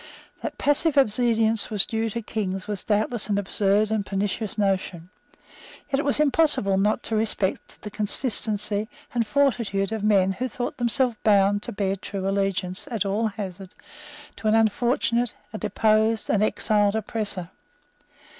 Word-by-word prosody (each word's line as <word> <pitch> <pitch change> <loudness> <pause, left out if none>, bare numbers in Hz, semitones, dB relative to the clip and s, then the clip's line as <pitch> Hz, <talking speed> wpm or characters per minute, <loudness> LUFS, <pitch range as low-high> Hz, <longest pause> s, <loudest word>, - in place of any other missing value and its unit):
That - - -5
passive 290 +1 +2
obedience 225 -3 +2
was 210 -3 +2
due 225 0 -2
to 230 +2 -5
Kings 195 -3 -3
was 205 -3 -3
doubtless 215 +1 -1
an 200 - +1
absurd 205 +1 +1
and 215 -2 0
pernicious 205 +2 -3
notion. 190 -3 -1 0.8
Yet 275 - +1
it 285 - -2
was 285 +1 +1
impossible 290 -10 +3
not 210 +4 +1
to 225 - -2
respect 215 -3 -1
the 210 - -7
consistency 210 -1 +1 0.2
and 235 -3 0
fortitude 230 -8 +1
of 220 -2 -3
men 195 -3 +3
who 250 +7 -3
thought 245 +1 -5
themselves 240 -1 +1
bound 205 -1 +3
to 240 - -5
bear 195 -2 -1
true 195 0 -5
allegiance, 195 -2 -1
at 225 -5 -1
all 210 +3 0
hazards, 195 -3 -7 0.6
to 220 - -3
an 215 - +4
unfortunate, 235 +1 +1 0.2
a 215 - -5
deposed, 215 +1 +1
an 205 - +2
exiled 210 -1 +1
oppressor. 205 -5 -3
215 Hz, 150 wpm, -24 LUFS, 195-225 Hz, 0.8 s, an